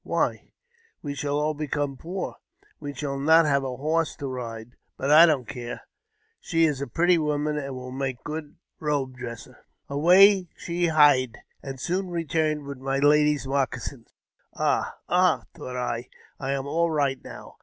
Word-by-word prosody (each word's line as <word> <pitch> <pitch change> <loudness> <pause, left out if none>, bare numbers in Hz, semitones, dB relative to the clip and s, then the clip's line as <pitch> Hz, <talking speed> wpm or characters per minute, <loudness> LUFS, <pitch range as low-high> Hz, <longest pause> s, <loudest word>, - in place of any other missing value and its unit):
Why, - - -1 0.5
we 145 -2 -3
shall 145 0 -1
all 155 +1 0
become 145 -2 -2
poor! 180 +7 -5 0.4
We 145 -1 -5
shall 140 0 -3
not 160 +3 +5
have 140 -2 +2
a 130 -2 -4
horse 160 +3 0
to 140 - -7
ride. 120 -3 -6 0.3
But 135 +2 -1
I 160 +3 +9
don't 135 -7 +1
care; 120 -1 -6 0.6
she 165 0 +2
is 145 -4 -1
a 140 - -3
pretty 175 0 +3
woman, 150 0 0
and 135 -2 -5
will 125 0 -7
make 130 -1 -3
a - - -35
good 150 -1 -6 0.2
robe 140 -4 -1
dresser." 120 -3 -9 0.3
Away 180 +6 +5
she 175 0 -1
hied, 145 -6 +4 0.2
and 135 -1 -7
soon 180 +6 -2
returned 160 -3 -1
with 140 -2 -7
my 135 +1 -1
lady's 150 0 +3
moccasins. 135 -2 -2 0.5
Ah, - - 0
ah! - - +3
thought 125 - -8
I, 125 0 -3 0.3
I 135 0 -2
am 135 -1 -3
all 170 +4 +1
right 140 -4 0
now - - -11
145 Hz, 165 wpm, -25 LUFS, 135-155 Hz, 0.6 s, I